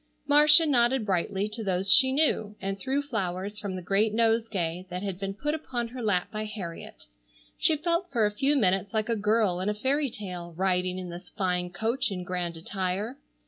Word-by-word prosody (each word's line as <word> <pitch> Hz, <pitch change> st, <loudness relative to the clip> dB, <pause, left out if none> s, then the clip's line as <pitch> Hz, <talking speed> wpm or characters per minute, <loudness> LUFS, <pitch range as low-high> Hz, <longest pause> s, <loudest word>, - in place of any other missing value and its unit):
Marcia 300 Hz, +3 st, +7 dB
nodded 250 Hz, -4 st, +2 dB
brightly 195 Hz, +1 st, 0 dB
to 220 Hz, +1 st, -5 dB
those 190 Hz, 0 st, +3 dB
she 260 Hz, -1 st, +6 dB
knew, 260 Hz, -8 st, +1 dB
and 195 Hz, 0 st, -4 dB
threw 270 Hz, +8 st, -1 dB
flowers 200 Hz, -4 st, -3 dB
from 200 Hz, -3 st, -4 dB
the 185 Hz, -, -6 dB
great 205 Hz, +4 st, +1 dB
nosegay 220 Hz, -6 st, 0 dB
that 180 Hz, +2 st, -5 dB
had 195 Hz, -3 st, -4 dB
been 195 Hz, 0 st, -4 dB
put 295 Hz, +7 st, -2 dB
upon 245 Hz, -7 st, -3 dB
her 250 Hz, +1 st, -7 dB
lap 205 Hz, -5 st, 0 dB
by 215 Hz, 0 st, -3 dB
Harriet. 200 Hz, -6 st, -7 dB, 0.6 s
She 315 Hz, -, +3 dB
felt 340 Hz, +4 st, -1 dB
for 230 Hz, -4 st, +2 dB
a 210 Hz, -, +1 dB
few 275 Hz, +7 st, +2 dB
minutes 195 Hz, -3 st, +1 dB
like 215 Hz, +1 st, 0 dB
a 230 Hz, -, +2 dB
girl 210 Hz, -3 st, +1 dB
in 190 Hz, +3 st, -1 dB
a 210 Hz, -, -1 dB
fairy 275 Hz, +6 st, 0 dB
tale 180 Hz, -6 st, -7 dB
riding 185 Hz, -1 st, 0 dB
in 185 Hz, -1 st, -6 dB
this 175 Hz, +1 st, -9 dB
fine 180 Hz, -3 st, -1 dB
coach 230 Hz, +9 st, -1 dB
in 185 Hz, -3 st, -4 dB
grand 175 Hz, -2 st, -3 dB
attire. 195 Hz, +8 st, -3 dB
210 Hz, 195 wpm, -27 LUFS, 185-240 Hz, 0.6 s, Marcia